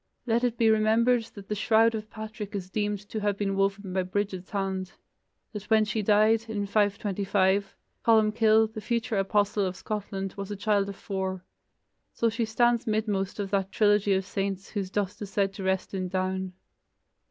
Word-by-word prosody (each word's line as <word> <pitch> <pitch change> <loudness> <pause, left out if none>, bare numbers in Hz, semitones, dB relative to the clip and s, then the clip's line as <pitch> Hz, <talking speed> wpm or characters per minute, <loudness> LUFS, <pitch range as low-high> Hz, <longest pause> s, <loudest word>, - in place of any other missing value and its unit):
Let 235 0 +1
it 240 -1 0
be 225 -1 +4
remembered 225 +2 +3
that 200 -2 -10
the - - -2
shroud 225 +2 +3
of 215 -1 -5
Patrick 215 -1 -7
is 185 -2 -5
deemed 205 -1 -2
to 220 - -4
have 205 -1 0
been 195 -1 -1
woven 195 -1 -1
by 190 - +1
Brigid's 185 0 -3
hand; 190 -1 -3 0.6
that 210 -1 -7
when 220 -1 +5
she 215 +1 -1
died, 215 +2 +3
in 205 -2 -2
525, 200 -1 +1 0.3
Columcille, 220 0 +4
the 215 - -6
future 235 -2 -1
apostle 205 +1 +1
of 185 -1 -2
Scotland, 195 -2 -4
was 200 0 -5
a 205 - -3
child 200 -1 +1
of 200 - -6
four. 190 -2 -4 0.7
So 230 - +1
she 230 +1 -1
stands 240 +2 +2
midmost 210 -3 -1
of 200 -1 -3
that 195 -1 0
trilogy 205 -1 +3
of 190 0 0
saints 195 0 -3
whose 200 -3 -3
dust 205 +1 -2
is 205 - -5
said 195 -1 0
to 195 - -7
rest 190 0 -1
in 185 -1 -2
Down. 185 0 -2
205 Hz, 180 wpm, -27 LUFS, 195-220 Hz, 0.7 s, when